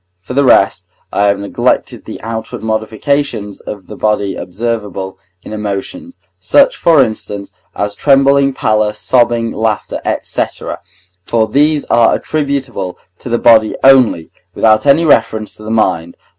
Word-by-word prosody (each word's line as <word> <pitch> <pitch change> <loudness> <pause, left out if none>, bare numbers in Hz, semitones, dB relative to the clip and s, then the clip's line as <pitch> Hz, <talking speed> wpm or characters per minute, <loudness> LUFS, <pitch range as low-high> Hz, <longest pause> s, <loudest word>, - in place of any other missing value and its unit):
For 95 +7 -9
the 140 +2 +2
rest, 130 - +3 0.3
I 100 - +2
have 100 0 +2
neglected 100 0 -1
the - - -8
outward 110 0 -6
modifications 110 0 -2
of 100 -3 -8
the - - -10
body 100 -3 -1
observable 100 -2 -4 0.2
in - - -9
emotions, 105 - -5 0.2
such, - - +3
for 160 -5 +4
instance, 105 -3 -6 0.2
as 100 0 -2
trembling, 140 +2 +3
pallor, 110 -3 0
sobbing, 120 0 +1
laughter, 110 -2 -2 0.2
&c., - - 0 0.8
for 110 +2 0
these 145 +5 +1
are 115 -1 +3
attributable 140 -10 -3 0.2
to - - -8
the 120 - +1
body 115 -2 +4
only, 130 -12 +4 0.2
without 110 +4 +3
any 150 +4 +4
reference 115 -6 +1
to 110 - -13
the 110 - -7
mind. 90 -7 0
110 Hz, 140 wpm, -14 LUFS, 105-135 Hz, 0.8 s, for